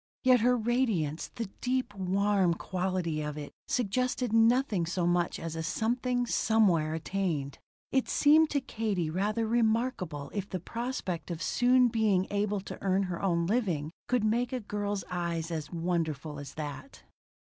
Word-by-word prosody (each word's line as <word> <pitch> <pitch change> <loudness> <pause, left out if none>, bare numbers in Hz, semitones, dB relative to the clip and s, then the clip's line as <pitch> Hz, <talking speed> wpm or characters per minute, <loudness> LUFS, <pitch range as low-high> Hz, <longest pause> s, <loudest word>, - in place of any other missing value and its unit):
Yet 255 -1 +6
her 245 +2 +3
radiance 220 - 0
the 230 - -3 0.2
deep, 255 -3 -1
warm 195 -1 +2
quality 180 -4 -2
of 150 0 -4
it 145 -1 -6 0.2
suggested 250 +1 0
nothing 225 -5 +3
so 175 0 -1
much 175 0 +1
as 165 -1 -5
a 165 - -3
something 245 +7 0
somewhere 185 -10 +2
attained. 160 -5 -2 0.3
It 265 -1 +1
seemed 310 +2 +5
to 280 - 0
Katie 205 -10 -2
rather 210 +6 0
remarkable 220 - 0
if 200 -1 -3
the 185 - -3
prospect 230 -4 -4
of 170 -1 -4
soon 250 0 +4
being 215 -5 +2
able 205 0 0
to - - -9
earn 195 0 +2
her 180 -3 -4
own 170 -3 +1
living 175 -8 0 0.2
could 245 -3 +1
make 235 +3 +1
a 255 - -1
girl's 205 -2 -3
eyes 170 -2 -2
as 155 -2 -4
wonderful 160 -4 -2
as 140 -1 -9
that. 155 - -7
195 Hz, 155 wpm, -30 LUFS, 170-235 Hz, 0.3 s, Yet